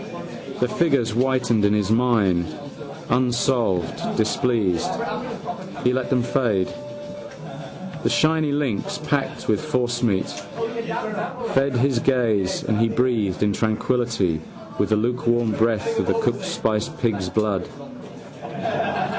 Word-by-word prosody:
The 125 Hz, -, +2 dB
figures 140 Hz, -6 st, +2 dB
whitened 125 Hz, -2 st, +2 dB
in 100 Hz, 0 st, +4 dB
his 105 Hz, -1 st, +1 dB
mind, 110 Hz, -8 st, +3 dB, 0.6 s
unsolved: 120 Hz, -7 st, +1 dB, 0.2 s
displeased, 105 Hz, -9 st, +1 dB, 0.9 s
he 125 Hz, -, +3 dB
let 130 Hz, -1 st, -1 dB
them 125 Hz, -2 st, +2 dB
fade. 110 Hz, -8 st, +1 dB, 1.3 s
The -, -, +1 dB
shiny 155 Hz, -1 st, +2 dB
links, 140 Hz, -8 st, -1 dB
packed -, -, -2 dB
with -, -, +2 dB
forcemeat, 120 Hz, -5 st, +1 dB, 1.3 s
fed 135 Hz, 0 st, +2 dB
his 125 Hz, 0 st, +2 dB
gaze 115 Hz, -8 st, +1 dB
and 110 Hz, -2 st, 0 dB
he 115 Hz, 0 st, +3 dB
breathed 110 Hz, -7 st, +1 dB
in 105 Hz, -1 st, +2 dB
tranquilly 110 Hz, -6 st, 0 dB, 0.4 s
the 110 Hz, -, +3 dB
lukewarm 120 Hz, 0 st, +1 dB
breath 115 Hz, -, +1 dB
of -, -, 0 dB
cooked 200 Hz, -, 0 dB
spicy 110 Hz, -12 st, 0 dB
pigs' 100 Hz, -6 st, 0 dB
blood. 105 Hz, -4 st, 0 dB
115 Hz, 105 wpm, -23 LUFS, 105-125 Hz, 1.3 s, in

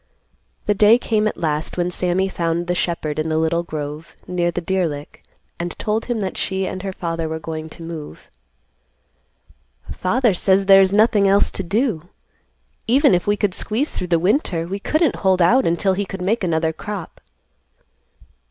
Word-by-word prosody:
The 210 Hz, -, +2 dB
day 210 Hz, +3 st, +6 dB
came 215 Hz, -3 st, 0 dB
at -, -, -3 dB
last 155 Hz, -1 st, -2 dB
when 175 Hz, 0 st, 0 dB
Sammy 180 Hz, +2 st, 0 dB
found 170 Hz, -2 st, -2 dB
the 180 Hz, -, -1 dB
shepherd 165 Hz, -4 st, -2 dB
in 155 Hz, +1 st, -1 dB
the 155 Hz, -, 0 dB
little 160 Hz, +1 st, +1 dB
grove, 150 Hz, -1 st, -7 dB
near 175 Hz, -1 st, 0 dB
the 175 Hz, -, -3 dB
deer 185 Hz, 0 st, 0 dB
lick, 145 Hz, -1 st, -8 dB, 0.4 s
and 175 Hz, 0 st, -4 dB
told 215 Hz, +1 st, -1 dB
him 240 Hz, -3 st, -2 dB
that 190 Hz, -2 st, -3 dB
she 190 Hz, 0 st, -1 dB
and 185 Hz, 0 st, -5 dB
her 195 Hz, 0 st, -4 dB
father 165 Hz, -3 st, -3 dB
were 160 Hz, -, -3 dB
going 160 Hz, 0 st, -6 dB
to 165 Hz, -, -11 dB
move. 160 Hz, -, -8 dB, 1.6 s
"Father 230 Hz, +4 st, +1 dB
says 190 Hz, +2 st, +3 dB
there 195 Hz, 0 st, +8 dB
is 190 Hz, -1 st, +3 dB
nothing 210 Hz, -1 st, +4 dB
else 200 Hz, +1 st, +3 dB
to -, -, -3 dB
do. 195 Hz, -, -1 dB, 0.8 s
Even 270 Hz, +1 st, +4 dB
if 175 Hz, +2 st, +1 dB
we 205 Hz, 0 st, +2 dB
could 205 Hz, -2 st, 0 dB
squeeze 230 Hz, +10 st, -1 dB
through 180 Hz, -, -4 dB
the 170 Hz, -1 st, +2 dB
winter, 180 Hz, -, 0 dB
we 195 Hz, +4 st, -4 dB
couldn't 310 Hz, -, +1 dB
hold 190 Hz, -2 st, +2 dB
out 235 Hz, +10 st, +4 dB
until 170 Hz, +3 st, +1 dB
he 200 Hz, +2 st, -1 dB
could 190 Hz, -1 st, -6 dB
make 210 Hz, +3 st, 0 dB
another 160 Hz, -2 st, 0 dB
crop." 195 Hz, 0 st, -7 dB
185 Hz, 180 wpm, -20 LUFS, 165-205 Hz, 1.6 s, there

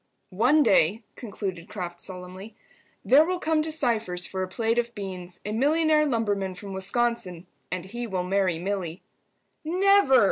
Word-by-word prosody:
"One 280 Hz, +8 st, +5 dB
day," 205 Hz, -, +3 dB
concluded 195 Hz, -6 st, -6 dB
Kraft, 175 Hz, -4 st, -5 dB
solemnly, 185 Hz, +3 st, -7 dB, 0.5 s
"there 285 Hz, +4 st, +7 dB
will 365 Hz, +3 st, -1 dB
come 320 Hz, -2 st, +1 dB
to 315 Hz, +1 st, -2 dB
Cypher's 225 Hz, -, -1 dB
for 190 Hz, -, -4 dB
a 185 Hz, -, -1 dB
plate 225 Hz, +4 st, 0 dB
of 235 Hz, 0 st, -3 dB
beans 185 Hz, -3 st, -6 dB
a 210 Hz, -, -3 dB
millionaire 305 Hz, +5 st, +3 dB
lumberman 205 Hz, -7 st, -1 dB
from 195 Hz, +2 st, -8 dB
Wisconsin, 190 Hz, -2 st, -1 dB, 0.3 s
and 180 Hz, -1 st, -3 dB
he 235 Hz, +5 st, -5 dB
will 185 Hz, -4 st, -2 dB
marry 185 Hz, -2 st, +1 dB
Milly." 180 Hz, -1 st, -4 dB, 0.6 s
"Never!" 365 Hz, -4 st, +4 dB
205 Hz, 150 wpm, -26 LUFS, 185-255 Hz, 0.6 s, there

